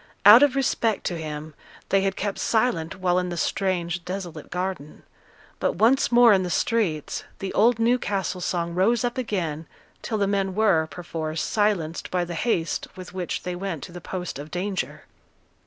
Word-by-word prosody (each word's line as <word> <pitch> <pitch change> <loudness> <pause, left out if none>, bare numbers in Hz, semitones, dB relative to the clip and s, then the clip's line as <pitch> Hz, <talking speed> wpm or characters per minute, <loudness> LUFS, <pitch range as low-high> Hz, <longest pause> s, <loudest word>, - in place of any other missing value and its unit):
Out 210 +5 +10
of 285 -2 +4
respect 230 -5 +1
to 175 - -2
him, 155 0 -6 0.4
they 195 - +3
had 195 0 0
kept 205 -1 -3
silent 220 -7 0
while 180 -1 +3
in 180 0 -2
the 175 - -4
strange, 175 -2 -1
desolate 180 -1 -6
garden; 180 -4 -4 0.6
but - - +1
once 235 +8 +3
more 240 -2 +7
in 190 - +3
the 180 - -3
streets, 175 - 0
the 195 - -5
old 230 +3 +4
Newcastle 210 -6 0
song 170 -1 -2
rose 215 +7 +2
up 245 +1 -1
again 165 -10 -3 0.3
till 220 - -2
the 200 - +2
men 195 -1 0
were, 195 -7 +3
perforce, 160 -2 -4
silenced 200 -7 0
by 180 -1 0
the 175 - -6
haste 170 -2 -1
with 185 -1 -10
which 185 -2 -3
they 180 0 -3
went 175 -5 -4
to - - -8
the 175 0 -9
post 180 -4 -5
of 145 +2 -8
danger. 190 +3 -3
185 Hz, 175 wpm, -25 LUFS, 170-210 Hz, 0.6 s, Out